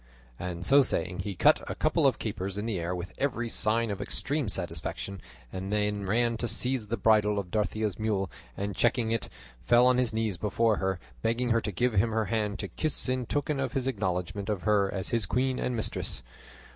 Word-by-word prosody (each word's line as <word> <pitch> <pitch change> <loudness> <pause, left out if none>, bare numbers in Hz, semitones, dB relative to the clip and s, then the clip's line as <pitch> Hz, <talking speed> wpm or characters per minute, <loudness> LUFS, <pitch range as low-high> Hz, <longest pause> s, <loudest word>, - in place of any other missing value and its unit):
And 85 -1 -4
so 140 +1 +7
saying 90 -8 +1
he 100 -2 -3
cut - - +5
a - - -3
couple - - +2
of - - +2
capers 95 +1 -4
in 105 - -3
the 110 -6 -1
air 85 +2 -2
with 90 +1 -6
every 120 -4 -1
sign 115 0 +2
of 100 0 -4
extreme 140 -4 -1
satisfaction, 90 +1 -4 0.3
and 95 +1 -4
then 105 -1 0
ran 115 +3 +2
to 120 - -1
seize 120 0 0
the 115 +3 -2
bridle 105 -2 +3
of 95 -3 -3
Dorothea's 105 -1 -1
mule, 100 -4 -1 0.3
and 100 0 -3
checking 115 +2 +2
it 115 -2 -1 0.3
fell 120 - +5
on 125 0 +4
his 125 -3 +2
knees 110 -5 -1
before 110 +2 +2
her, 95 -1 -1 0.2
begging 120 - 0
her 115 0 +3
to 105 - -3
give 120 +5 +1
him 110 +3 +3
her 110 -1 +1
hand 105 0 -1
to 100 - -4
kiss 155 - 0
in 130 -2 -1
token 145 +1 -1
of 130 -2 -2
his 130 -2 -1
acknowledgment 100 -4 -2
of 100 -4 -2
her 100 -2 +3
as 95 -1 -3
his 115 -6 +1
queen 130 +3 0
and 125 - -1
mistress. 105 - -1
105 Hz, 210 wpm, -29 LUFS, 95-120 Hz, 0.3 s, so